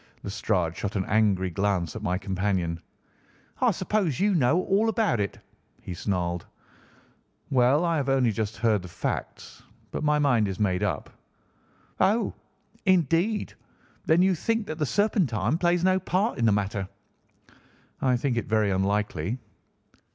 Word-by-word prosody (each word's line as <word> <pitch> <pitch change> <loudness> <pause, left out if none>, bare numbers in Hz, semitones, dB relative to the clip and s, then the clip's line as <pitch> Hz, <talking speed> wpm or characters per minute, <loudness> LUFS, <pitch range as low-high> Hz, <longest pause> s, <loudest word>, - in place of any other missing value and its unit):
Lestrade 95 -5 -1
shot 100 +1 -4
an 95 -2 0
angry 100 -4 +2
glance 95 -2 -1
at 110 - -5
my 90 -3 0
companion. 95 -3 -1 0.8
"I - - +4
suppose 190 - 0
you 205 +1 +3
know 165 +3 +3
all 210 +4 +2
about 220 - +1
it," 100 -1 -2 0.4
he 90 - -7
snarled. 90 -2 -2 1.0
"Well, 135 +5 +4
I 170 -1 +1
have 140 -2 -1
only 130 -3 +3
just 110 0 -3
heard 110 -3 +2
the 90 - -9
facts, 85 - -5 0.3
but - - -4
my 150 0 +3
mind 125 -8 +3
is 95 0 -5
made 95 -4 +1
up." - - -2 0.9
"Oh, 220 +4 +2 0.5
indeed! 185 - +2 0.5
Then 165 +3 +5
you 190 0 +4
think 225 +6 -1
that 155 -2 -6
the 150 - 0
Serpentine 160 - +1
plays 175 -1 +2
no 185 0 +3
part 185 - -1
in 115 - +2
the 110 - +5
matter?" 100 -1 -1 1.1
"I 130 -2 +2
think 120 -1 -1
it 115 - -2
very 110 -2 +2
unlikely." 100 +1 -1
115 Hz, 150 wpm, -26 LUFS, -, 1.1 s, Then